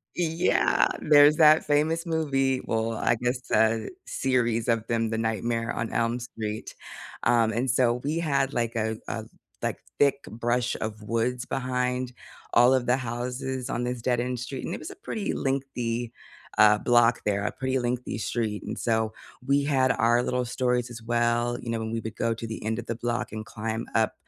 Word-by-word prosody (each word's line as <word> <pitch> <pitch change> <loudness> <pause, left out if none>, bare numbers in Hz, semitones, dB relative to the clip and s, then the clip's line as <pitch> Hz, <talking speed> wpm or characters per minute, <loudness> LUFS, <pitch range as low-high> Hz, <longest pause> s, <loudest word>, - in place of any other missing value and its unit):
yeah, 170 0 +2
there's 150 0 +6
that 155 0 +6
famous 155 +3 +1
movie, 135 -5 +1
well, 115 0 -1
I 120 - +1
guess 125 +1 0
uh 110 0 +3 0.3
series 120 -3 0
of 115 -1 +1
them, 115 -1 0
The 110 - -1
Nightmare 115 +1 -1
on 115 -1 -3
Elm 115 +1 +1
Street, 110 -3 -5 0.5
um, 115 -2 +3
and 125 +3 0
so 120 -1 +3
we 150 +3 -1
had 140 -4 +1
like 115 -1 -1
a 110 0 -1
a 110 -1 -4 0.4
like - - -1 0.2
thick 140 -1 +3
brush 120 +2 -1
of 110 -1 -4
woods 120 +3 -1
behind 125 -1 -1 0.4
all 120 +2 +6
of 125 -2 0
the 125 - +3
houses 125 +1 -4
on 120 - -1
this 125 -1 -3
dead-end 125 0 0
street, 130 +1 -5
and - - -3
it - - -7
was 155 - -7
a - - -10
pretty 215 - -3
lengthy, 120 -4 -2 0.5
uh, 105 0 +7
block 120 -1 +4
there, 100 -1 +1
a - - 0
pretty 130 0 -1
lengthy 120 -2 -2
street, 105 0 -2
and - - -5
so 110 -1 +1 0.3
we 140 +1 +3
had 130 -3 +3
our 120 +1 +3
little 125 0 -1
stories 125 0 0
as 115 -1 -8
well, 120 +1 +1
you 115 - -7
know, 115 - -1
when 110 0 -4
we 115 - -1
would 110 0 -6
go 115 0 0
to 115 0 -6
the 110 - -6
end 110 +1 -1
of 120 - -6
the 115 - -2
block 120 +1 -2
and 110 0 -6
climb 110 +1 -4
up, 110 -1 +2
120 Hz, 190 wpm, -26 LUFS, 115-130 Hz, 0.5 s, uh